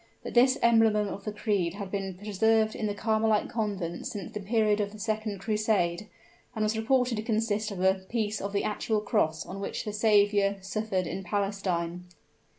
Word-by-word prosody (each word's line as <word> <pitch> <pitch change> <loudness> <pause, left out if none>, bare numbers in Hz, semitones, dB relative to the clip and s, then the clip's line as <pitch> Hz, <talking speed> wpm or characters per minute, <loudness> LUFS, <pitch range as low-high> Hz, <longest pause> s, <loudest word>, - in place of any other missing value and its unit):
But - - -6
this 255 +2 +5
emblem 225 -2 +5
of 205 -1 -2
the 210 - -2
creed 200 -5 -1
had 200 -2 -6
been 195 -2 -3
preserved 215 +3 +2
in 215 - -2
the 205 - -2
Carmelite 220 0 +1
Convent 200 -7 -3
since 200 -4 -6
the 210 - -3
period 210 0 +2
of 200 0 -2
the - - -9
Second 215 -1 -2
Crusade, 210 -3 0 0.5
and 215 - 0
was 215 +1 +1
reported 245 +1 +1
to - - -1
consist 220 -1 0
of 190 -3 -4
a 190 0 +5
piece 205 +2 -3
of 200 - -3
the 200 - 0
actual 215 +1 0
cross 160 -8 0
on 195 - -7
which 200 - -4
the 210 - -4
Saviour 205 -2 +3
suffered 195 -1 -2
in 190 +3 -4
Palestine. 180 -3 -2
210 Hz, 185 wpm, -28 LUFS, 195-220 Hz, 0.5 s, this